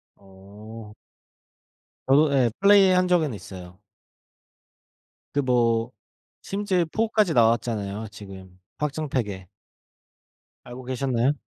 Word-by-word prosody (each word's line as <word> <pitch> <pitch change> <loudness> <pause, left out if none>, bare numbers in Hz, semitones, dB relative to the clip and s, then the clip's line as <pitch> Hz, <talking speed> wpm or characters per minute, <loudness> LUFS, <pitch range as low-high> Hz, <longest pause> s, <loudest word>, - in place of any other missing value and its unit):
어. 105 +3 -13 1.1
저도 140 +2 +4
예 130 -3 +3
플레이한 195 -2 +5
적은 165 -7 +1
있어요. 95 -3 -11 1.5
그 145 - 0
뭐 120 -2 +1 0.5
심즈에 195 -2 -1
4까지 215 -5 +1
나왔잖아요 110 -3 0
지금 95 -3 -12 0.2
확장팩에. 130 - -3 1.2
알고 125 +1 -10
계셨나요? 130 0 0
120 Hz, 195 characters per minute, -24 LUFS, 105-150 Hz, 1.5 s, 플레이한